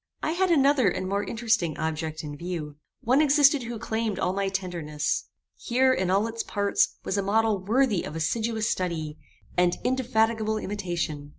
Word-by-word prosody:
I 315 - 0
had 370 +3 +1
another 280 - +4
and 185 +1 -3
more 200 +2 0
interesting 220 -9 0
object 160 0 -3
in 145 -1 -6
view. 155 -3 -5 0.2
One 260 +3 +3
existed 290 -1 +5
who 235 -1 -5
claimed 220 -2 -2
all 185 - 0
my 195 0 -1
tenderness. 175 -6 -2 0.3
Here, 260 +2 +2
in 190 -6 -1
all 195 +3 +3
its 230 0 -3
parts, 200 -1 0
was 200 - 0
a - - +2
model 215 +1 +2
worthy 220 -2 +2
of 150 - -7
assiduous 220 +7 -1
study, 160 -6 -2 0.4
and 175 0 +2
indefatigable 225 -4 +1
imitation. 175 -8 -3
205 Hz, 165 wpm, -26 LUFS, 175-235 Hz, 0.4 s, existed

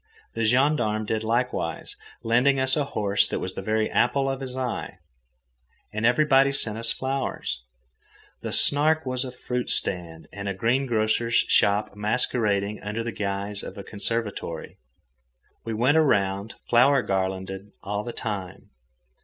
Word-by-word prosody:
The 115 - -2
gendarme 120 -3 +2
did 110 +1 -1
likewise, 120 +3 -1 0.3
lending 125 +4 +3
us 130 0 +4
a 145 - +1
horse 100 -6 +1
that - - -2
was - - -3
the - - -5
very 110 0 0
apple 135 +2 +1
of 135 0 -5
his 130 -1 -6
eye. 130 -2 -3 1.0
And 110 +2 +1
everybody 135 +1 +4
sent 110 -5 0
us 115 0 +1
flowers. 130 - -3 0.8
The - - -4
Snark 155 +2 +4
was 130 0 0
a 130 - -6
fruit 125 0 -4
stand 85 -3 -1
and 100 0 -4
a 100 - -3
greengrocer's 115 0 +1
shop 105 +1 +3
masquerading 105 -1 0
under 105 +3 -3
the 115 - -3
guise 100 0 -2
of - - -8
a 100 - -6
conservatory. 105 -6 -3 0.9
We 115 -1 -3
went 130 +7 +3
around 100 -8 +1
flower 125 +2 +5
garlanded 95 +1 -3
all 105 +1 -3
the 120 - -5
time. 100 -7 -6
115 Hz, 145 wpm, -25 LUFS, 100-130 Hz, 1.0 s, flower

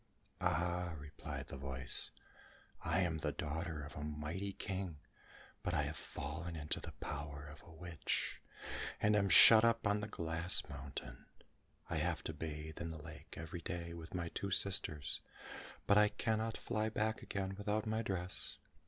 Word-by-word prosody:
"Ah," 85 0 +1
replied 75 +1 -6
the 70 - -5
voice, 65 -1 +3 0.7
"I 95 - +2
am 80 -3 +1
the - - 0
daughter 80 0 -3
of 75 - -9
a - - -5
mighty 75 +6 -3
King; 95 -4 -3 0.6
but - - -1
I - - +3
have - - -3
fallen 85 +4 -5
into 75 -1 -2
the - - -7
power 70 0 -5
of 75 0 -11
a 85 - -16
witch, 80 0 -1 0.6
and 105 0 +4
am 100 -1 +3
shut 110 +3 +10
up 115 -1 +3
on 105 0 +3
the 105 - -3
glass 85 -2 0
mountain. 70 -3 -7 0.6
I - - -1
have - - 0
to - - -3
bathe 80 0 -5
in 85 - -2
the 80 - -5
lake 80 +1 -10
every 85 +1 -5
day 85 0 -4
with 85 +1 -8
my 85 -2 -1
two 100 - -3
sisters, 95 -7 +3 0.6
but 100 +1 +6
I 105 0 +6
cannot 110 0 0
fly 110 -2 0
back 110 0 0
again 95 -2 -2
without 105 +1 0
my 110 +1 0
dress. 95 -4 -2
85 Hz, 165 wpm, -37 LUFS, 75-100 Hz, 0.7 s, shut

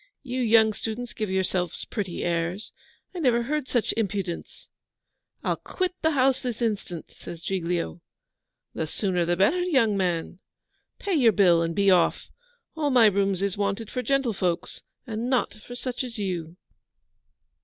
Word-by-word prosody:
'You 255 -1 -3
young 220 -2 +5
students 230 +3 -5
give 215 -3 -3
yourselves 185 -2 -1
pretty 195 -6 -4
airs. 170 +4 -1 0.4
I 360 - -5
never 240 -6 +3
heard 290 +2 -2
such 240 -3 +1
impudence.' 195 -5 -3 0.8
'I'll - - 0
quit 370 -1 -2
the 320 - +3
house 260 0 +3
this 245 -3 -3
instant,' 205 -7 -3
says 170 -1 -9
Giglio. 175 - -2 0.7
'The 160 - -2
sooner 180 0 0
the 175 +1 +1
better, 255 - +3
young 265 - +3
man. 175 -2 -1 0.6
Pay 400 - -2
your 245 -9 +5
bill 175 -5 +5
and 165 0 -1
be 200 -1 +4
off. 180 -2 +2 0.5
All 305 -2 0
my 250 -4 +6
rooms 195 -2 +2
is 200 0 -1
wanted 200 +2 -1
for 250 - -2
gentlefolks, 230 -11 -1 0.2
and 230 0 -3
not 255 -2 +1
for 215 +3 -11
such 250 0 -3
as 245 -2 -6
you. 175 -4 -3
210 Hz, 155 wpm, -26 LUFS, 180-245 Hz, 0.8 s, my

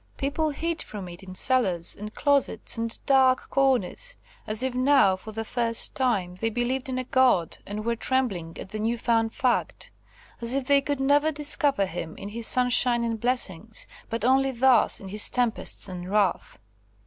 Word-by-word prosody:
People 295 +3 -1
hid 330 +3 -3
from 200 -4 -7
it 175 +1 -10
in 185 -1 -11
cellars, 185 -8 +1
and 210 +1 -9
closets, 285 -1 0
and 230 0 -2
dark 265 -2 +3
corners, 270 - 0 0.3
as 215 +3 +1
if 260 -1 -1
now, 255 -6 +4
for 185 +4 -10
the 225 +1 -5
first 230 -1 -1
time, 210 -9 0
they 225 +5 -2
believed 245 +3 -2
in 255 - -2
a 255 - -1
God, 250 -10 +2
and 210 +2 -5
were 235 0 0
trembling 220 -11 -1
at - - -8
the 215 - -6
newfound 225 0 0
fact; 250 0 -2 0.5
as 235 +2 0
if 275 -2 -1
they 280 +1 +4
could 285 0 -3
never 290 +3 +3
discover 290 -6 +1
Him 165 -3 -6
in 200 - -7
His 230 +2 -1
sunshine 250 -1 +4
and 230 -1 -2
blessings, 225 -4 -2 0.2
but 230 0 -3
only 270 +1 +3
thus 260 0 +3
in 195 - -10
His 210 +2 +4
tempests 245 -5 0
and 180 -1 -7
wrath. 200 -3 0
240 Hz, 175 wpm, -25 LUFS, 210-265 Hz, 0.5 s, now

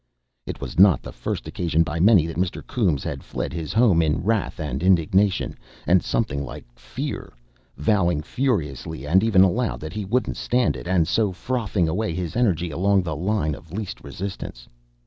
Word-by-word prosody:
It - - -5
was - - -5
not 95 -3 +6
the - - -7
first - - -4
occasion 85 -2 +1
by 80 +1 -4
many 95 -3 +6
that 85 - -5
Mr. 90 0 -2
Coombes 90 - 0
had - - -4
fled - - -4
his 80 -3 -4
home 110 -8 +4
in 80 0 0
wrath 110 -2 0
and 75 -4 -3
indignation, 95 +2 +2 0.3
and 90 0 +4
something 70 -11 -1
like 65 - -8
fear, - - -6 0.5
vowing 85 -2 +1
furiously 80 - -2
and 90 +7 +3
even 100 -5 +5
aloud 115 +6 +1
that 80 +1 -6
he 105 0 -3
wouldn't 120 +6 -1
stand 125 0 +1
it, - - -8
and 90 -3 +2
so 105 -4 +1
frothing 105 -4 -1
away 90 +2 -1
his 90 -2 -4
energy 90 -9 +1
along 95 +4 +2
the 80 -3 -3
line 90 -1 0
of 80 +3 -11
least 105 +1 -5
resistance. 95 -11 -7
90 Hz, 180 wpm, -23 LUFS, 80-105 Hz, 0.5 s, not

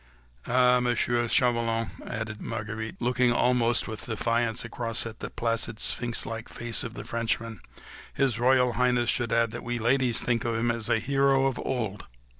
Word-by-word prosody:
"Ah, 125 0 +4
Monsieur 120 -1 +1
Chauvelin," 115 -2 +1 0.2
added 110 -2 -5
Marguerite, 110 0 -5
looking 125 0 +2
almost 120 -1 +2
with 110 -1 -6
defiance 115 +1 0
across 115 0 -1
at 115 -1 -7
the - - -5
placid, 115 -1 -1
sphinx 120 -2 0
like 115 0 -6
face 120 -1 -1
of 115 - -7
the - - -7
Frenchman, 115 -2 -2 0.5
"His 130 -4 0
Royal 125 0 +3
Highness 125 -1 +2
should 120 -3 -1
add 115 -1 +2
that 120 - -7
we 120 0 -2
ladies 120 +1 +2
think 120 -2 0
of 115 -1 -1
him 120 +1 +1
as 115 -1 -2
of - - +4
a - - +1
hero 135 +1 +2
of 135 -2 -1
old 110 -6 -3
120 Hz, 175 wpm, -27 LUFS, 115-125 Hz, 0.5 s, Ah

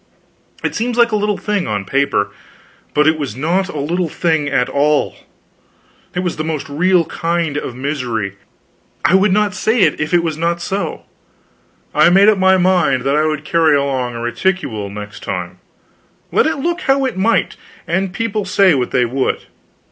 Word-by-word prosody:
It - - -1
seems 240 +2 -2
like 235 -1 +4
a - - +1
little 210 -1 0
thing, 210 -3 -2
on 105 -2 -2
paper, 100 -4 0 0.6
but 150 - +4
it 155 0 +3
was 135 -8 -4
not 175 +8 0
a - - -6
little 170 +4 -1
thing 160 -3 0
at 125 -3 +1
all; 145 +1 +1 1.0
it 180 - 0
was 180 -2 -3
the 155 - -2
most 155 -2 -3
real 175 +4 +2
kind 165 -3 -2
of 130 -4 -4
misery. 125 -7 -3 0.7
I - - +4
would 190 +1 +4
not 205 +1 +2
say 220 +3 +1
it - - +2
if 150 - -2
it 175 -1 +3
was 160 -2 -3
not 170 +1 0
so. 195 +3 -3 0.9
I - - +5
made 195 +4 +6
up 210 -3 +2
my 190 0 +5
mind 180 -8 +2
that 135 +2 +1
I 155 +1 +2
would 155 -1 -3
carry 160 -2 +3
along 130 -4 -1
a 115 - -5
reticule 120 - -2
next 105 +2 -8
time, - - -5 0.7
let - - +3
it 315 - -1
look 345 +5 -2
how 270 -3 +2
it 255 -6 -2
might, 200 +5 +1 0.3
and 190 +2 -1
people 215 +1 -2
say 190 -1 +4
what 125 -4 0
they 125 - +2
would. 130 +3 -1
165 Hz, 185 wpm, -17 LUFS, 140-190 Hz, 1.0 s, made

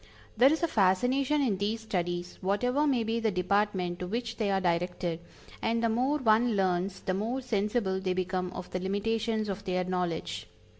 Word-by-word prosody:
There 255 +5 +6
is 320 +2 0
a - - +4
fascination 255 - +2
in 210 -8 0
these 215 +3 -1
studies, 175 -4 -3
whatever 245 +10 +1
may 255 -5 +2
be 225 +1 -1
the 225 -1 +1
department 185 -1 0
to 180 - -4
which 230 +2 -3
they 215 -3 0
are 195 -1 +2
directed, 175 -1 -1 0.4
and 230 +1 0
the 230 - +3
more 255 +6 +1
one 230 -3 +3
learns 190 0 0
the 185 - -1
more 225 +7 -1
sensible 210 -4 0
they 185 -1 -1
become 185 0 -2
of 180 - -7
the 185 - -2
limitations 215 +3 -1
of 195 0 -4
their 185 -1 0
knowledge. 180 -3 -2
205 Hz, 185 wpm, -29 LUFS, 185-230 Hz, 0.4 s, There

